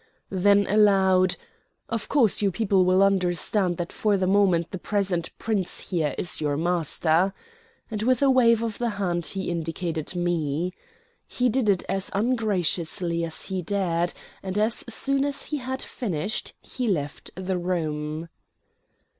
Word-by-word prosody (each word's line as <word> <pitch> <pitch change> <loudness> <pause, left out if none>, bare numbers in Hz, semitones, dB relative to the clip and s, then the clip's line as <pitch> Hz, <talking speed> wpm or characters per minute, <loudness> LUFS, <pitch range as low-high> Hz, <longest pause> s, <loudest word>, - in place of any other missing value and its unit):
Then 200 +2 +4
aloud, 190 -3 +4 0.5
"Of 230 -1 -4
course 240 -10 +3
you 200 - +3
people 190 -1 +2
will 185 +2 +4
understand 185 -1 +1
that 175 -1 -4
for 210 -2 +1
the 190 - 0
moment 185 -3 +3
the 190 - -5
present 190 -4 -1
Prince 205 -5 -2
here 155 -6 0
is 170 - -3
your 145 -2 0
master," 170 +2 +1 0.6
and 210 -1 -3
with 255 +3 +2
a 275 - +5
wave 230 -3 +4
of 225 -2 -4
the 240 -1 0
hand 175 -4 -1
he 190 -2 -3
indicated 165 0 -3
me. 175 -1 -1 0.5
He 250 0 +1
did 240 -2 +1
it 190 -3 +2
as 195 0 -2
ungraciously 185 -7 0
as 165 -1 -3
he 190 -2 -3
dared, 175 -2 0 0.3
and 190 +1 -4
as 215 +2 +1
soon 275 +4 +1
as 280 -1 -2
he 300 - -3
had 260 0 -4
finished 200 - -3
he 250 -2 -4
left 145 -8 -2
the 185 0 -2
room. 155 -3 -2
190 Hz, 150 wpm, -25 LUFS, 170-215 Hz, 0.6 s, a